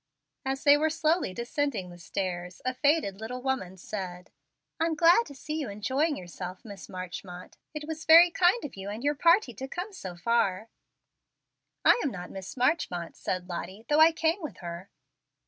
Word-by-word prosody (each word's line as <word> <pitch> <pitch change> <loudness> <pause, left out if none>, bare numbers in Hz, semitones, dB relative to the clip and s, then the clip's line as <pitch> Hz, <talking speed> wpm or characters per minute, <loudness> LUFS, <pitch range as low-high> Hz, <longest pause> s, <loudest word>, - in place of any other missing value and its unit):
As 270 0 -2
they 290 0 +7
were 315 +2 +2
slowly 320 - +1
descending 235 - -2
the 175 - -12
stairs 180 -1 -4
a 255 - 0
faded 285 -7 +1
little 250 +3 -5
woman 220 -9 -2
said, 180 -1 -6 0.5
"I'm 330 0 +1
glad 345 +8 +5
to 280 - -11
see 305 +3 -4
you 280 - -3
enjoying 260 +10 0
yourself, 180 +2 -8
Miss 200 -4 -10
Marchmont. 180 0 -8 0.2
It 300 0 -5
was 320 0 -5
very 335 +2 +9
kind 365 +7 +3
of 280 - -7
you 195 +1 -6
and 215 +4 -6
your 290 +1 +2
party 335 - +4
to 265 +5 -6
come 360 +8 -5
so 185 - -7
far." 215 +1 0 1.2
"I - - +6
am 285 - +1
not 180 -6 -7
Miss 190 +5 -8
Marchmont," 240 - 0
said 180 -1 -3
Lottie, 185 +4 -6
"though 295 +1 +4
I 320 +1 +8
came 330 +3 0
with 295 - -6
her." 170 +2 -7
240 Hz, 180 wpm, -28 LUFS, 185-310 Hz, 1.2 s, very